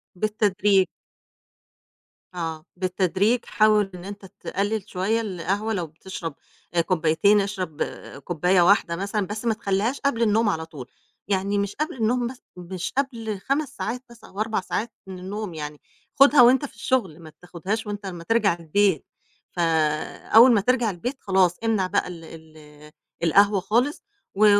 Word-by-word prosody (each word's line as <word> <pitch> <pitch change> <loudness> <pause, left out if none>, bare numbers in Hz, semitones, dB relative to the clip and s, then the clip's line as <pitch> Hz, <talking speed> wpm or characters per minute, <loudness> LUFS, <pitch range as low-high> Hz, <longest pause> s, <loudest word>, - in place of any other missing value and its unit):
بالتدريج. 205 -2 +2 1.5
آه، 165 -3 -5
بالتدريج 185 +5 +1
حاول 215 -2 +3
إن 175 - -10
أنت 200 0 -8
تقلِّل 205 +2 -3
شوية 205 +5 0
القهوة، 205 +2 -2
لو 175 -5 -2
بتشرب 165 -1 -7 0.4
آآ 170 - +3
كوبّايتين 180 +4 +3
اشرب 190 -6 -3 0.4
كوبّاية 180 +2 +2
واحدة 175 -2 +4
مثلًا، 200 +1 -2
بس 210 +4 -5
ما 230 - +3
تخلّيهاش 215 +4 -1
قبل 255 -5 0
النوم 220 0 +3
على 160 -3 -2
طول. 150 -6 -10 0.4
يعني 200 +1 0
مش 200 0 -2
قبل 305 -2 -3
النوم 240 +1 +1
مث 255 +1 -8 0.2
مش 180 +1 -5
قبل 230 -7 -2
5 275 +6 -1
ساعات 245 +3 -4
بس 235 -1 -16
أو 195 - -11
4 215 -2 0
ساعات 225 +4 -3 0.2
من 185 -1 -8
النوم 200 0 -5
يعني، 150 -1 -7 0.4
خُدها 280 -1 +8
وأنت 255 +4 +6
في - - -12
الشُغل، 190 -11 -1
ما 160 -2 -12
تاخُدهاش 185 +5 -4
وأنت 205 0 -5
أمّا 175 -3 -6
ترجع 220 -1 +2
البيت. 175 0 +1 0.5
فأول 165 +8 +3
ما 205 - +3
ترجع 245 0 +2
البيت 220 +8 -4
خلاص 185 -2 +2
امنع 215 -5 +1
بقى 200 - 0
ال 170 -2 -9
ال 155 -2 -14 0.3
القهوة 200 +4 +4
خالص 240 +9 0 0.3
و 215 +2 +4
200 Hz, 150 wpm, -24 LUFS, 175-220 Hz, 1.5 s, خُدها